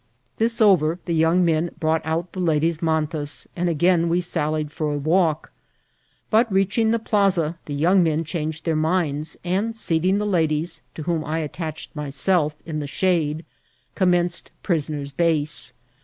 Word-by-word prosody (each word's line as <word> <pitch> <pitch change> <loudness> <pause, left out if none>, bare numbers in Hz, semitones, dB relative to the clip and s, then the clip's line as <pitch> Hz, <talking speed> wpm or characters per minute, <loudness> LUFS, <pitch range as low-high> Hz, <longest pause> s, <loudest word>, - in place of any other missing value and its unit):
This 230 +1 +1
over, 175 -6 +4
the 170 - -1
young 165 +3 +3
men 165 +1 +1
brought 160 0 +1
out 165 +2 -2
the 190 - -6
ladies' 165 -1 +1
mantas, 155 -2 0
and 175 0 0
again 170 +1 +2
we 170 +2 +2
sallied 155 -3 -2
for 150 0 -2
a 145 - -1
walk; 160 +1 +1 0.8
but, 225 0 +3
reaching 195 +4 +2
the 230 - +2
plaza, 195 -7 +1
the 145 - -5
young 175 +6 +4
men 160 -1 +1
changed 160 -1 -4
their 165 -2 +1
minds; 155 -2 -1
and 195 +6 -1
seating 185 -2 +2
the 210 - -1
ladies, 160 -5 0
to 155 - -6
whom 165 -1 -1
I 155 +1 -2
attached 155 0 -5
myself, 150 +2 0
in 155 -2 -4
the 145 - -4
shade, 160 -1 0 0.5
commenced 175 -2 +1
prisoner's 150 -4 -2
base. 155 -1 -1
165 Hz, 155 wpm, -23 LUFS, 155-180 Hz, 0.8 s, over